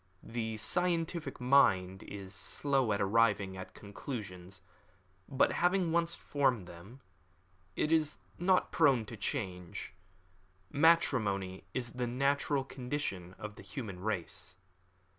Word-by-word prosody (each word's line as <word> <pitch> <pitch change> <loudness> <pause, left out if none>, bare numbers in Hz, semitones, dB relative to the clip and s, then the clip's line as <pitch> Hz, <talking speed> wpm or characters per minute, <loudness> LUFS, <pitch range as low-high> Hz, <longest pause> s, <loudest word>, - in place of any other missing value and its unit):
The 110 -1 -3
scientific 165 +1 -1
mind 95 -8 +4
is 100 -2 -8
slow 130 +5 0
at 100 - +1
arriving 100 -2 +3
at 95 0 -8
conclusions, 100 -4 -7 0.7
but 135 - +3
having 180 -1 +2
once 170 0 +1
formed 130 -9 +1
them, 95 +10 -12 0.7
it 150 - 0
is 155 -2 +2 0.2
not 185 +1 +3
prone 135 -8 +4
to 115 - -8
change. 95 - -4 0.8
Matrimony 110 - +3
is 120 -2 -2
the 125 -1 -2
natural 140 +2 +1
condition 125 -10 -4
of 105 0 -7
the - - -9
human 105 -10 -6
race. 95 -3 -3
120 Hz, 115 wpm, -33 LUFS, 95-145 Hz, 0.8 s, mind